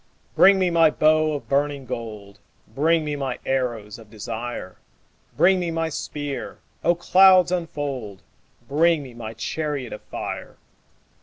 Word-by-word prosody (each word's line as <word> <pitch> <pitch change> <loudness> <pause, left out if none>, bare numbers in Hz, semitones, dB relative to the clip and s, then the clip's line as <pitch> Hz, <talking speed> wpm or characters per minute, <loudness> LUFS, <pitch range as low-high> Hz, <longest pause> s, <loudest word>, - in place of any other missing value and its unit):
Bring 195 0 +7
me 185 -2 +1
my 165 -2 +5
bow 155 0 +3
of 145 - -5
burning 140 -1 0
gold: 105 -4 -7 0.3
Bring 155 +7 +1
me 150 -1 -2
my 135 -3 -3
arrows 120 -5 -2
of 110 -2 -15
desire: 110 -2 -6 0.6
Bring 190 +1 +5
me 175 -1 -2
my 165 0 -1
spear: 145 -2 -5 0.3
O 175 +1 +3
clouds 185 0 +5
unfold! 140 - -4 0.4
Bring 160 +1 +2
me 130 -3 -11
my 115 -1 -8
chariot 145 +1 -3
of - - -8
fire. - - -7
145 Hz, 140 wpm, -23 LUFS, 120-165 Hz, 0.6 s, Bring